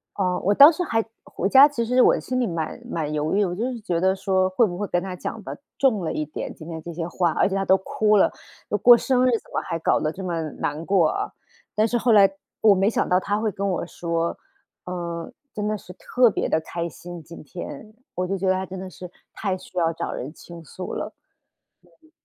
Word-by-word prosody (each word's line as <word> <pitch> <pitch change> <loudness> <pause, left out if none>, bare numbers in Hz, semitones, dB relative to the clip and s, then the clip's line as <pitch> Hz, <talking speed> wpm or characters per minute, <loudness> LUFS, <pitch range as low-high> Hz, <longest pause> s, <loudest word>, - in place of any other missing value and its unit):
哦， 180 -2 0
我 200 - +4
当 285 +8 +9
时 340 - -4
还 225 -9 0 0.2
回 195 - -2
家 270 +5 +9
其 285 -6 -2
实 250 +2 +3
我 - - +5
心 255 0 -2
里 245 - +1
蛮 165 +2 -4
蛮 155 -6 -2
犹 150 +1 -1
豫， 205 - +3
我 180 -3 -1
就 215 +7 -2
是 - - -6
觉 175 -5 -1
得 190 +2 +2
说 190 -1 +1
会 205 +6 +3
不 175 -4 -4
会 205 +1 -3
跟 175 0 0
她 190 -1 -5
讲 215 +4 -6
得 - - -7 0.2
重 220 -10 +2
了 - - -2
一 155 - -1
点， 150 - -6
今 160 - -11
天 160 -1 -6
这 170 +1 -7
些 165 0 -3
话， 175 0 0
而 - - +2
且 - - -4
她 195 0 0
都 190 - +5
哭 210 +2 +1
了， 200 - +4 0.4
都 210 - +1
过 240 +4 +8
生 255 +1 +2
日， - - +3
怎 230 - -3
么 - - +1
还 165 - -2
搞 - - +2
得 155 +1 -1
这 190 - -7
么 170 -3 -2
难 150 +3 -4
过 180 -5 +3
啊。 - - -3 0.4
但 215 - +3
是 240 +2 0
后 235 0 +3
来 200 -2 +7 0.3
我 215 -2 +7
没 195 +2 +3
想 - - -1
到 180 - +4
她 205 +2 -1
会 220 -1 0
跟 200 +1 -2
我 175 - -2
说， 170 -1 -2 0.5
呃， 170 -2 -5 0.2
真 210 0 -2
的 215 0 -1
是 180 - -13
特 245 +6 +2
别 - - -1
的 160 - +1
开 170 +1 -4
心 175 0 -9
今 165 +2 -12
天， 185 +7 -9 0.2
我 180 - -1
就 195 +2 -2
觉 190 +1 -2
得 185 - +4
她 190 0 -2
真 190 0 -8
的 190 0 -7
是 180 0 -10 0.2
太 195 -3 -2
需 185 - -14
要 165 -2 +2
找 165 - -4
人 135 - -5
倾 170 -1 -12
诉 180 +4 -7
了。 - - -4 0.9
对。 315 -1 -25
185 Hz, 265 characters per minute, -24 LUFS, 170-215 Hz, 0.9 s, 当